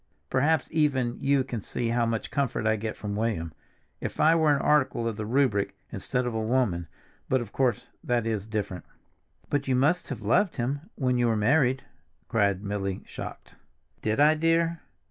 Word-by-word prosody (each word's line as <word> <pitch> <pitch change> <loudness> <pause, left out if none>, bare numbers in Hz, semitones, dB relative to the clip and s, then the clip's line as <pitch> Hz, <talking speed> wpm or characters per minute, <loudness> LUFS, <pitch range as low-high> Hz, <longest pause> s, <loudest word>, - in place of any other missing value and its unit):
Perhaps 155 +5 +2
even 135 -6 +1
you 140 -1 +3
can 125 -4 -5
see 115 +4 -3
how 120 0 +1
much 115 -1 -2
comfort 135 -5 -1
I 110 0 +3
get 110 0 -4
from 100 -1 -4
William. 105 -8 -1 0.5
If - - -5
I 155 +2 +6
were 160 -2 +4
an - - -1
article 135 -5 +2
of 115 - -2
the 105 0 -4
Rubric, 115 -5 +1
instead 125 0 -2
of 120 - -2
a 110 - -1
woman—but 110 0 -1
of 115 -4 -6
course, 125 -2 0 0.2
that 120 -2 0
is 110 -2 -2
different." 105 -4 -3 0.7
"But 145 -1 0
you 130 - +2
must 150 +8 +2
have 120 -6 -5
loved 170 - +2
him 140 - -3
when 125 -2 +1
you 120 - +3
were 115 - +2
married," 130 +4 +3 0.5
cried 100 -3 +1
Milly, 100 -2 -3
shocked. - - -8 0.5
"Did 110 +3 0
I, 150 +2 +6
dear? 165 +1 +1
120 Hz, 180 wpm, -27 LUFS, 110-140 Hz, 0.7 s, I